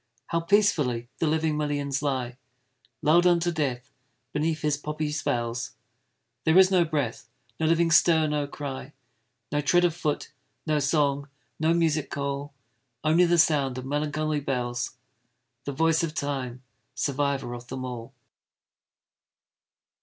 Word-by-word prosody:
How 165 - +1
peacefully 165 - +2
the 165 - +1
living 155 0 +1
millions 145 -2 -1
lie! 130 -4 -2 0.7
Lull'd 170 +4 +5
unto 175 0 +3
death 135 -5 -2 0.4
beneath 155 +1 -1
his 150 -1 +2
poppy 150 +1 -3
spells; 120 -4 -2 0.7
There 160 +2 +4
is 190 0 +7
no 180 -2 +5
breath 145 -8 -3 0.3
no 160 - +1
living 165 +1 +3
stir 160 0 +5
no 150 -1 -1
cry 140 0 -6 0.6
No 145 0 +1
tread 175 +4 +4
of 170 -2 +1
foot 155 -5 -2 0.3
no 155 -1 +1
song 140 0 +1 0.3
no 160 +1 +2
music 155 -4 +1
call 140 0 -3 0.5
Only 160 +3 +4
the 175 0 +3
sound 145 -5 +3
of 130 - -5
melancholy 150 +2 -1
bells 125 -2 -3 0.7
The 140 - -2
voice 160 +3 +2
of 160 -2 -3
Time 130 -3 -3 0.3
survivor 140 -1 -1
of 120 0 -8
them 130 +1 -5
all! 120 -2 -7
150 Hz, 135 wpm, -26 LUFS, 135-160 Hz, 0.7 s, is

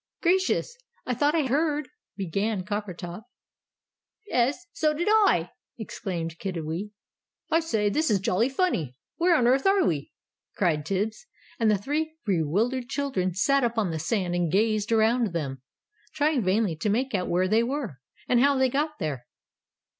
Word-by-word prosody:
"Gracious! 375 +6 +2 0.3
I 250 - -1
thought 290 +6 +2
I 320 - +3
heard 295 +2 0 0.2
" - - -56
began 195 +1 -1
Coppertop. 190 -2 -5 1.1
"'Es, 260 +8 +1
so 305 -1 +1
did 345 +5 -2
I!" 405 - +4 0.3
exclaimed 170 -7 -5
Kiddiwee. 175 +1 -4 0.6
"I 325 - +5
say, 225 -11 0
this 305 +10 +1
is 205 - +3
jolly 195 +6 +1
funny! 260 - 0 0.2
Where 345 0 +4
on 250 - +3
earth 265 +7 +3
are 390 -1 +4
we?" 145 -4 -1 0.4
cried 155 -6 0
Tibbs. 210 - -2 0.3
And 225 -2 +3
the 210 - +3
three 310 +9 -2
bewildered 210 - 0
children 230 - -1
sat 275 +8 +3
up 235 -1 0
on 205 -6 +1
the 160 - -3
sand 180 +2 -1
and 175 -2 0
gazed 215 +2 +1
around 225 -2 +3
them, 135 -6 -3 0.5
trying 295 -2 +2
vainly 190 -1 +1
to 185 +7 -1
make 255 +5 0
out 185 -3 -1
where 180 +2 +2
they 220 +4 +3
were, 235 - -3 0.3
and 245 - +3
how 280 +2 +4
they 260 0 +3
got 300 +3 -1
there. 135 - -4
220 Hz, 160 wpm, -26 LUFS, 180-280 Hz, 1.1 s, I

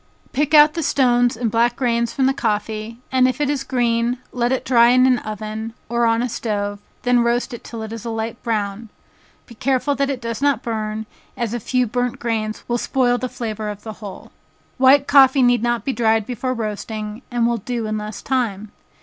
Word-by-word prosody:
Pick 295 +2 +2
out 300 0 +8
the 335 - -2
stones 245 -5 +2
and 230 -2 -1
black 235 +2 +2
grains 235 -2 0
from 265 +2 0
the 270 - +3
coffee, 220 -1 -2
and 255 -1 +4
if 255 +1 -2
it 290 -1 +1
is 275 -2 -2
green, 240 -1 0
let 240 0 0
it 260 - -1
dry 235 -2 +5
in 255 +1 +5
an 255 -2 +3
oven, 215 +1 -6
or 235 0 +2
on 230 +1 +2
a - - 0
stove, 205 -3 -3 0.2
then 245 0 +3
roast 240 +2 0
it 240 - -8
till 230 -2 -7
it 220 0 -6
is 230 -2 -7
a 235 - -4
light 225 +1 -4
brown, 215 -1 -2 0.6
be 235 - -14
careful 260 +4 0
that 275 0 0
it 270 -3 -2
does 230 +1 -5
not 280 -5 +2
burn, 220 -1 -3 0.3
as 235 -3 -2
a 240 - -2
few 250 +3 0
burnt 245 +2 -2
grains 220 -2 -3
will 240 0 0
spoil 245 -1 +1
the 255 - -3
flavor 215 -3 -4
of 205 -1 -7
the 220 - -6
whole. 200 -3 -9 0.5
White 270 +2 +6
coffee 270 -1 +6
need 245 -1 +4
not 240 0 0
be 270 - 0
dried 225 -2 +2
before 255 +2 -3
roasting, 215 0 -5
and 240 -1 0
will 235 0 +1
do 235 +2 -4
in 215 0 -2
less 210 -1 -7
time. 215 -6 -1
235 Hz, 210 wpm, -20 LUFS, 220-255 Hz, 0.6 s, out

